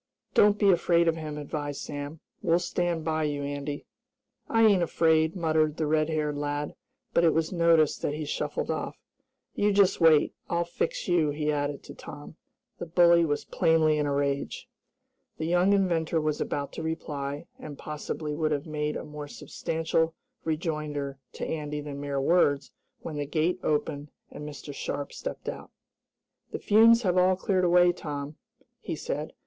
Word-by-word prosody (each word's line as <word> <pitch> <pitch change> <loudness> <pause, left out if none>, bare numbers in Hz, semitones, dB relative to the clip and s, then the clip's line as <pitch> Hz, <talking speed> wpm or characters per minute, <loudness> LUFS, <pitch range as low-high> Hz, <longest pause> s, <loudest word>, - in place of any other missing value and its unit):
"Don't 210 0 +5
be 200 -1 +5
afraid 170 -1 +3
of 165 - +3
him," 155 -2 -5
advised 145 -1 -4
Sam. 145 +2 -6 0.2
"We'll 165 - +3
stand 175 -2 -1
by 155 -1 0
you, 145 -1 -2
Andy." 145 0 -4 0.6
"I 225 0 +4
ain't 200 -4 +5
afraid," 160 -1 +2
muttered 155 -3 +1
the 160 - 0
red 155 +1 +2
haired 150 -2 -1
lad, 145 0 -2 0.4
but 170 - +4
it 165 - +4
was 160 +2 0
noticed 165 -3 +3
that 145 - -1
he 155 0 -4
shuffled 145 - -2
off. - - -4 0.6
"You 205 0 +2
just 195 -2 +3
wait, 155 -2 +5 0.2
I'll 170 0 +1
fix 170 -1 -3
you," 170 -4 +3
he 150 +1 -1
added 145 -1 -2
to - - -10
Tom. 145 +2 -10 0.4
The - - -5
bully 170 0 +5
was 145 -2 -1
plainly 160 -3 +3
in 150 - +1
a - - 0
rage. 140 0 -1 0.7
The 160 - -3
young 175 +3 +3
inventor 170 -5 +2
was 155 -1 -1
about 140 -1 -3
to - - -5
reply, 145 -3 -4
and, 145 -2 -8
possibly 150 0 -5
would 155 0 0
have 145 -1 -1
made 150 -1 -2
a - - -6
more 150 -1 -7
substantial 160 +2 -2 0.3
rejoinder 150 -4 -3
to - - -4
Andy 150 -2 -3
than 145 -1 -6
mere 140 -1 -2
words, 145 -2 +2 0.3
when 155 -2 -6
the 145 -1 -2
gate 165 +4 0
opened, 150 -1 -1 0.2
and 150 0 -7
Mr. 145 0 -8
Sharp 140 +1 -4
stepped - - -6
out. - - -5 0.8
"The - - -3
fumes 230 +3 +5
have 185 -2 +3
all 185 +1 +4
cleared 185 0 +1
away, 175 0 +5
Tom," 145 -3 -6 0.4
he - - -4
said. - - -4
155 Hz, 170 wpm, -28 LUFS, 145-170 Hz, 0.8 s, Don't